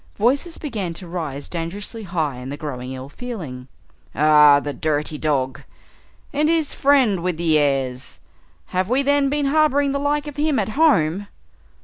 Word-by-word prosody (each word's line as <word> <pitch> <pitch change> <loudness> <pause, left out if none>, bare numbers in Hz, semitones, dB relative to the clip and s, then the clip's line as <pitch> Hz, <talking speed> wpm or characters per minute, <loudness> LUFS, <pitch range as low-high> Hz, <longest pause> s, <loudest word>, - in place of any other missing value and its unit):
Voices 275 - 0
began 210 - -4
to 180 - -9
rise 155 -5 -4
dangerously 190 +7 -5
high 160 -9 -2
in 125 +1 -7
the 145 - -5
growing 130 -4 -6
ill 130 0 -7
feeling. 145 - -7 0.5
"Ah 150 -1 +6
the 145 0 -5
dirty 150 +2 -2
dog 135 -4 -1 0.4
" - - -33
"And 300 +2 +2
his 325 -3 +1
friend 260 -10 +3
with 180 -2 -1
the 160 -2 +3
airs!" 135 -3 -1 0.5
"Have 185 +2 0
we 265 +3 +2
then 285 0 +2
been 290 0 0
harboring 285 -1 +3
the 280 - -1
like 290 +1 0
of 295 -1 -8
him 300 -1 +1
at - - 0
home?" 205 - +2
180 Hz, 165 wpm, -21 LUFS, -, 0.5 s, Ah